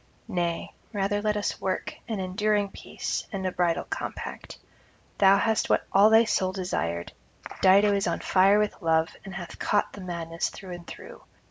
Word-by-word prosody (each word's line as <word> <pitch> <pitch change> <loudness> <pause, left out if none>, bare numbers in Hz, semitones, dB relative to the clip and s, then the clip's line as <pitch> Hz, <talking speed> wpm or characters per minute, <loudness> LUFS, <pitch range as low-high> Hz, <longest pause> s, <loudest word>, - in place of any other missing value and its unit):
Nay, 175 -5 -2 0.2
rather 205 0 0
let 210 0 0
us 205 - -2
work 190 -1 -2
an 220 -4 -3
enduring 205 +2 0
peace - - -5
and 190 -2 -4
a 185 - 0
bridal 175 -2 +1
compact. - - -6 0.6
Thou 195 0 +7
hast 220 +1 +1
what - - +2
all 200 +2 +7
thy 225 +1 +7
soul 190 -4 0
desired; 85 - -3 0.5
Dido 200 +2 +6
is 200 +1 0
on - - -1
fire 195 +2 +4
with 210 -1 -1
love, 160 -1 +2
and 195 -2 -8
hath 175 -2 -8
caught 205 - +1
the 200 - -9
madness 170 -2 -3
through 190 -2 -10
and 175 -1 -8
through. - - -10
195 Hz, 170 wpm, -27 LUFS, 175-205 Hz, 0.6 s, Thou